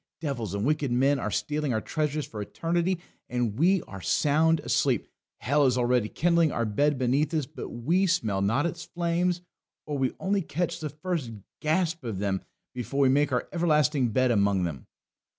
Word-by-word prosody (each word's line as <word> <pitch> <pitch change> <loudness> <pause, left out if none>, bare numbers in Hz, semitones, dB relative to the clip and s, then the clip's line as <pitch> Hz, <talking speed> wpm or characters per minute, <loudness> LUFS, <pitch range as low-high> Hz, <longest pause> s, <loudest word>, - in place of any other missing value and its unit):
Devils 120 - -3
and 100 +2 -1
wicked 150 -2 +1
men 135 +3 +3
are 110 - -2
stealing 150 +5 -1
our - - +1
treasures 150 +2 -2
for 105 -4 -7
eternity, 170 - -1 0.3
and 120 -2 -1
we 185 +2 +4
are 95 -1 -10
sound 155 - +3
asleep; 135 -5 +1 0.3
hell 140 +3 +2
is 125 - +1
already 120 -3 +2
kindling 170 -2 +2
our 115 - -1
bed 145 +7 +1
beneath 130 +4 +1
us, 155 -4 0
but 145 -1 -8
we 170 +12 +1
smell 110 - +1
not 115 +10 +2
its 170 0 -3
flames, 175 +1 -1 0.4
or 145 -2 -3
we 130 -1 0
only 195 +1 +1
catch 175 +1 -2
the 155 -2 -4
first 155 -5 -3 0.3
gasp 165 0 0
of 115 -5 -4
them 95 -1 -1 0.3
before 125 +3 -2
we 135 - +5
make 145 +2 +3
our 125 - 0
everlasting 150 -6 +2
bed 130 +3 +2
among 100 -4 +2
them. 75 -8 -4
145 Hz, 180 wpm, -27 LUFS, 120-165 Hz, 0.4 s, we